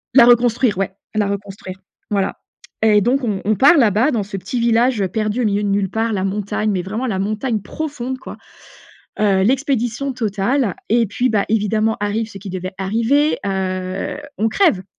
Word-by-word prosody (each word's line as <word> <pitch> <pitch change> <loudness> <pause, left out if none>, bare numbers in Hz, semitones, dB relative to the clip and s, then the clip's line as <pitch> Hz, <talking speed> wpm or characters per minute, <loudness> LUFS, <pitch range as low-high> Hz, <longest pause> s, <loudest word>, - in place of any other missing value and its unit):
La 240 - +9
reconstruire, 240 -2 +3
ouais, 195 -1 -1 0.2
la 210 -2 +1
reconstruire, 195 -2 -6 0.3
voilà. 195 -2 0 0.5
Et 210 -2 +5
donc 255 +5 +1
on 205 -5 -1
on 215 0 +2
part 285 - +6
là-bas, 230 +3 +3
dans 225 -4 0
ce 195 0 -6
petit 240 +6 -4
village, 235 -1 +2
heu, 190 - +1
perdu 215 +4 -1
au 235 - +1
milieu 205 0 +1
de - - 0
nulle 195 -1 +1
part. 225 0 -1
La 190 -1 -1
montagne, 205 +2 -1
mais 185 -2 0
vraiment 220 +7 -3
la 195 -4 -1
montagne 215 +3 -1
profonde, 260 +1 -5
quoi. - - -9 0.8
Heu, 200 -3 +3
l'expédition 265 +1 0
totale 220 0 0
et 230 +1 +3
puis, 245 +5 0
bah, 205 -3 +1
évidemment 220 0 +1
arrive 215 +2 -1
ce 195 - -10
qui 195 0 -8
devait 185 +1 -5
arriver, 230 +10 +1
heu, 185 +1 -2 0.2
on 220 +1 +1
crève. 265 - +2
215 Hz, 185 wpm, -19 LUFS, 195-240 Hz, 0.8 s, La